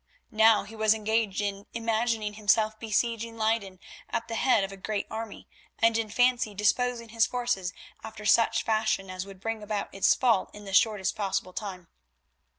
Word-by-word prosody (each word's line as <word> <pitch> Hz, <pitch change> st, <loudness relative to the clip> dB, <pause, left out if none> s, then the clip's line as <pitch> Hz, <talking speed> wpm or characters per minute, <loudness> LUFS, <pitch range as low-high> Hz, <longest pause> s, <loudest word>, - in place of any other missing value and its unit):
Now 220 Hz, -1 st, +5 dB
he 210 Hz, +3 st, -11 dB
was 220 Hz, 0 st, +3 dB
engaged 220 Hz, -2 st, 0 dB
in 200 Hz, 0 st, -4 dB
imagining 225 Hz, -2 st, -1 dB
himself 215 Hz, +1 st, +1 dB
besieging 230 Hz, +1 st, -1 dB
Leyden 215 Hz, -4 st, -1 dB, 0.3 s
at 230 Hz, -1 st, -3 dB
the 230 Hz, -, -6 dB
head 225 Hz, -2 st, +3 dB
of 195 Hz, -, -4 dB
a -, -, -8 dB
great 205 Hz, +2 st, -3 dB
army, 220 Hz, -1 st, -7 dB, 0.3 s
and 230 Hz, 0 st, +3 dB
in 225 Hz, -1 st, -1 dB
fancy 245 Hz, -2 st, +2 dB
disposing 230 Hz, +3 st, 0 dB
his 225 Hz, 0 st, +2 dB
forces 240 Hz, -7 st, -1 dB, 0.3 s
after 215 Hz, -1 st, -9 dB
such 230 Hz, +2 st, +3 dB
fashion 215 Hz, -3 st, 0 dB
as 185 Hz, +1 st, -5 dB
would 195 Hz, -1 st, -12 dB
bring 225 Hz, +2 st, -3 dB
about 210 Hz, -1 st, -4 dB
its 195 Hz, -, +3 dB
fall 235 Hz, -7 st, +2 dB
in 210 Hz, 0 st, -11 dB
the 195 Hz, -, -7 dB
shortest 210 Hz, -2 st, +3 dB
possible 195 Hz, -3 st, -2 dB
time. 185 Hz, -4 st, -6 dB
215 Hz, 170 wpm, -28 LUFS, 200-230 Hz, 0.3 s, Now